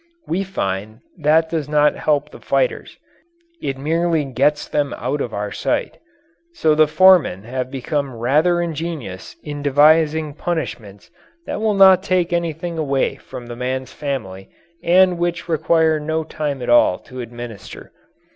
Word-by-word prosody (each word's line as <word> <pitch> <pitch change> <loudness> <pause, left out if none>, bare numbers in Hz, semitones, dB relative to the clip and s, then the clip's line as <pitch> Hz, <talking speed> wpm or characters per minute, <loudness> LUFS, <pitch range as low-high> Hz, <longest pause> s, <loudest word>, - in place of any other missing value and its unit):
We 180 +4 -1
find 110 - -4 0.2
that 155 +2 +3
does 155 -3 -2
not 150 0 +3
help 150 -1 0
the - - -12
fighters 460 -3 -1 0.6
it 135 - -3
merely 165 +2 0
gets 140 +3 0
them 145 -2 -1
out 140 +4 -2
of 120 - -3
our 105 -1 -4
sight. 135 - -2 0.6
So 155 - +2
the 155 0 +4
foremen 175 - +4
have 125 +2 -4
become 135 0 -3
rather 150 +9 +2
ingenious 155 - -5
in 145 -1 -6
devising 150 +2 +3
punishments 120 - -5 0.3
that - - -4
will 215 -2 +1
not 190 -2 +7
take 180 -2 0
anything 170 0 -2
away 140 -3 0
from 120 - -10
the 120 0 -8
man's 130 +1 -4
family 110 -10 -5 0.3
and 180 0 +4
which 175 -1 -2
require 160 -1 +2
no 160 +1 -2
time 150 -4 -4
at - - -4
all 120 -6 +5
to 130 0 -8
administer. 120 -4 -9
150 Hz, 145 wpm, -20 LUFS, 130-165 Hz, 0.6 s, not